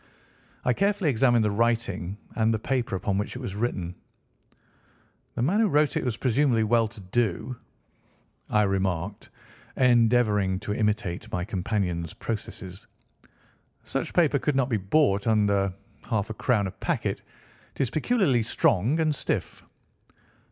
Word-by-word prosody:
I 125 - +3
carefully 200 - +1
examined 120 -2 +3
the 105 - +1
writing, 105 -4 0 0.2
and 110 -1 +2
the 110 - +1
paper 120 -1 -1
upon 95 +1 -1
which 105 - -4
it - - -5
was 120 -7 -5
written. 100 -5 -2 1.4
"The 120 - -1
man 185 - +2
who 225 - +4
wrote 150 -4 +2
it - - 0
was 120 -3 -2
presumably 125 -2 +2
well 115 +1 +3
to 110 0 -13
do," 110 +4 -1 0.9
I 105 0 +3
remarked, 95 -1 -2 0.5
endeavouring 115 -6 +3
to 105 0 -3
imitate 105 -4 -1
my 90 0 -2
companion's 90 -5 -2
processes. 95 -4 -6 1.0
"Such - - -4
paper 155 -5 +3
could 150 +1 0
not 135 -2 +1
be 115 - +1
bought 100 0 +2
under 100 -3 +2 0.4
half 110 0 -1
a - - -3
crown 110 -2 +1
a 95 - -3
packet. - - -2 0.5
It - - -3
is 130 -3 0
peculiarly 155 - +2
strong 115 - +1
and 155 -1 +2
stiff." - - -3
110 Hz, 145 wpm, -26 LUFS, 100-125 Hz, 1.4 s, who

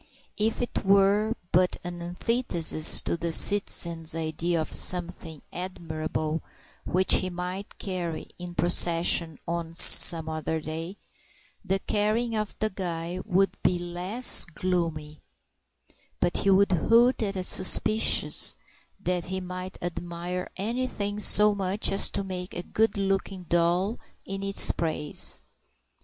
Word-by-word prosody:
If 220 +3 -1
it 240 - -5
were 200 +3 +2 0.2
but 180 +1 +1
an 175 -1 -8
antithesis 175 -3 +3
to - - -2
the 170 0 -4
citizen's 170 -4 +3
idea 165 +1 -3
of 155 - -5
something 175 -3 0
admirable 160 -3 -5 0.4
which 185 +1 +2
he 185 - -3
might 180 +3 -7
carry 175 -4 -5
in 175 0 -9
procession 170 -2 +2
on 165 -1 -5
some 165 -1 +8
other 160 0 -4
day, 165 +5 -7 0.7
the 195 - -1
carrying 215 +4 -2
of 215 -1 -5
the 215 0 -3
guy 175 -1 -6
would 195 -1 0
be 180 - 0
less 180 +7 +1
gloomy; 165 -3 -4 1.0
but 175 - -1
he 195 - -1
would 195 +1 +3
hoot 230 +9 +2
at 200 -2 -3
a 185 - -4
suspicion 215 +4 +2 0.7
that 180 -1 -2
he 190 +1 -5
might 185 +1 -8
admire 175 +1 -6
anything 210 -1 -4
so 210 0 +5
much 195 +1 -1
as 195 - +1
to - - -4
make 185 -1 -7
a 175 - -6
good 220 +2 -1
looking 195 -1 -3
doll 175 +5 -1 0.3
in 195 0 -7
its 195 0 +3
praise. 155 -3 0
180 Hz, 130 wpm, -25 LUFS, 170-195 Hz, 1.0 s, some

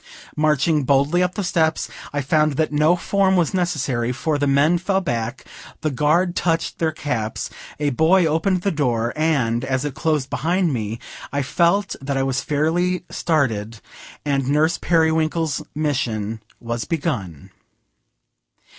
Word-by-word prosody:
Marching 150 0 +2
boldly 140 +6 +2
up 180 0 0
the 205 - -2
steps, 160 -2 +1 0.2
I 145 - -1
found 150 +2 +2
that 155 +2 0
no 155 +3 +4
form 190 +1 +1
was 175 -1 +1
necessary, 140 -10 0
for 145 +4 -1
the 145 - +1
men 145 +5 +3
fell 190 +2 +1
back, 120 -7 -3 0.4
the 155 -1 0
guard 155 +6 +2
touched 165 -2 -1
their 160 -1 +1
caps, 125 -8 -3 0.3
a 145 -1 +1
boy 165 +7 +4
opened 170 +4 +1
the 200 - +1
door, 120 -6 0
and, 135 -7 +1
as 130 0 -1
it 145 - -3
closed 150 -4 -1
behind 170 +3 +1
me, 110 -2 -3 0.3
I 140 0 -1
felt 175 +9 +1
that 135 0 -2
I 135 - +1
was 135 0 0
fairly 175 +5 0
started, 115 -9 -1 0.5
and 140 -2 0
Nurse 155 +3 +2
Periwinkle's 160 -1 +1
Mission 115 -8 -2 0.2
was 115 0 -3
begun. 125 - -3
150 Hz, 145 wpm, -21 LUFS, 130-165 Hz, 0.5 s, no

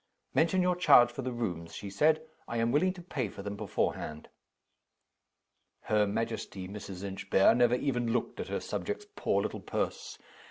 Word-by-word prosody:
"Mention 180 +3 +3
your 180 0 +2
charge 120 -9 +6
for 130 - -5
the 130 0 -3
rooms," 90 -9 -4
she 100 -2 -6
said. 155 +8 +3 0.2
"I 115 - -3
am 115 +1 +2
willing 180 +8 +3
to 180 -2 -11
pay 130 - -3
for 100 - -9
them 100 0 -4
beforehand." 75 -5 -3 1.5
Her 105 -1 +2
majesty, 110 -3 -3
Mrs. 100 -2 -7
Inchbare, 95 +1 +3
never 120 0 +4
even 120 -3 0
looked 120 0 -1
at - - -3
her - - -2
subject's 415 - -4
poor - - +1
little - - -3
purse. - - -3
115 Hz, 165 wpm, -31 LUFS, 100-140 Hz, 1.5 s, charge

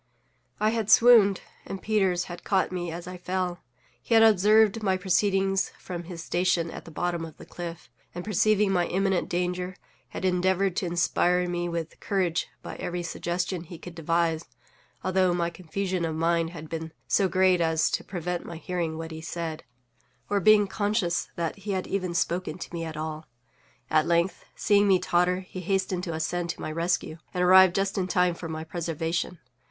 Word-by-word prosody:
I 215 - +3
had 225 -2 -2
swooned, 220 -5 +7 0.2
and 195 - -6
Peters 190 -4 +1
had 175 0 -9
caught 190 -2 +1
me 175 -2 -3
as 170 +1 -6
I 180 0 -7
fell. 180 -1 -2 0.4
He 230 - +1
had 225 - +7
observed 215 +1 +5
my 190 -3 +1
proceedings 195 +1 +1
from 175 -2 -7
his 170 -2 -7
station 175 -2 +1
at - - -9
the - - -10
bottom 170 +1 -2
of 160 -1 -9
the - - -12
cliff; 170 -1 -7 0.3
and 175 - -5
perceiving 210 0 +3
my 175 -2 +2
imminent 190 -1 0
danger, 180 +1 -2 0.3
had 180 - -5
endeavored 185 +1 +2
to 185 - 0
inspire 180 +1 +2
me 175 0 -2
with 170 -1 -5
courage 185 -4 0 0.2
by - - -7
every 175 0 -3
suggestion 175 +2 -2
he 170 +1 -9
could 175 +1 -10
devise; 165 0 0 0.6
although 185 -1 +2
my 170 -1 0
confusion 185 +1 -3
of 160 -1 -1
mind 165 0 +1
had 160 -2 -9
been 160 0 -5
so 195 - +3
great 185 -1 +3
as 160 -1 +2
to - - -1
prevent 180 -1 -4
my 170 - -8
hearing 170 -2 -3
what 165 0 -6
he 160 0 -7
said, 165 -1 -5 0.7
or 205 - +3
being 210 +2 +6
conscious 205 -3 -1
that 170 +1 -2
he 200 +1 -4
had 185 -1 -2
even 185 -3 -2
spoken 175 0 -1
to 180 - -8
me 170 -1 -3
at 160 -2 -6
all. 155 0 -5 0.6
At 155 +1 +2
length, 170 +1 +1
seeing 205 0 +3
me 190 -2 +5
totter, 180 +1 +1
he 185 0 -9
hastened 190 -1 -1
to 170 - -3
ascend 170 +2 -2
to - - -4
my - - -4
rescue, 165 0 -1 0.2
and 180 - +1
arrived 185 0 +7
just 195 0 0
in 185 - -1
time 180 -1 +2
for 170 -1 -7
my 160 0 -4
preservation. 165 +1 -3
180 Hz, 185 wpm, -27 LUFS, 170-190 Hz, 0.7 s, swooned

